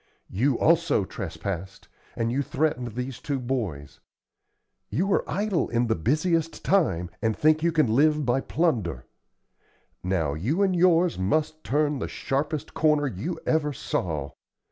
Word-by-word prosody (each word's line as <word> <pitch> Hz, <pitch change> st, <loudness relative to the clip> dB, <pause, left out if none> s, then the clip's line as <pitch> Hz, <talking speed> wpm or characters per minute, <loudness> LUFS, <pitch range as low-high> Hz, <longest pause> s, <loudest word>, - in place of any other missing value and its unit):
You 125 Hz, +7 st, +1 dB
also 165 Hz, -, +3 dB
trespassed, 95 Hz, +1 st, -6 dB, 0.3 s
and 115 Hz, 0 st, -1 dB
you 135 Hz, +3 st, +1 dB
threatened 130 Hz, -5 st, -1 dB
these 125 Hz, 0 st, -4 dB
two 140 Hz, +2 st, -2 dB
boys; 110 Hz, -, -4 dB, 0.9 s
you 195 Hz, +6 st, 0 dB
are -, -, +2 dB
idle 205 Hz, -3 st, 0 dB
in 120 Hz, +1 st, +1 dB
the 115 Hz, -, +1 dB
busiest 155 Hz, -, 0 dB
time, 95 Hz, -, +2 dB
and 110 Hz, -2 st, 0 dB
think 155 Hz, +1 st, +3 dB
you 170 Hz, +1 st, +2 dB
can 155 Hz, -2 st, +3 dB
live 150 Hz, +6 st, +3 dB
by 125 Hz, +2 st, +2 dB
plunder. 110 Hz, -, -1 dB, 1.0 s
Now, 85 Hz, -6 st, 0 dB
you 130 Hz, -, 0 dB
and 190 Hz, -2 st, +2 dB
yours 175 Hz, -, +3 dB
must 155 Hz, +11 st, 0 dB
turn 150 Hz, 0 st, +1 dB
the -, -, -3 dB
sharpest 145 Hz, +2 st, -3 dB
corner 150 Hz, -2 st, +2 dB
you 135 Hz, -, -4 dB
ever 150 Hz, -2 st, +1 dB
saw. 75 Hz, -, -3 dB
140 Hz, 145 wpm, -26 LUFS, 110-155 Hz, 1.0 s, also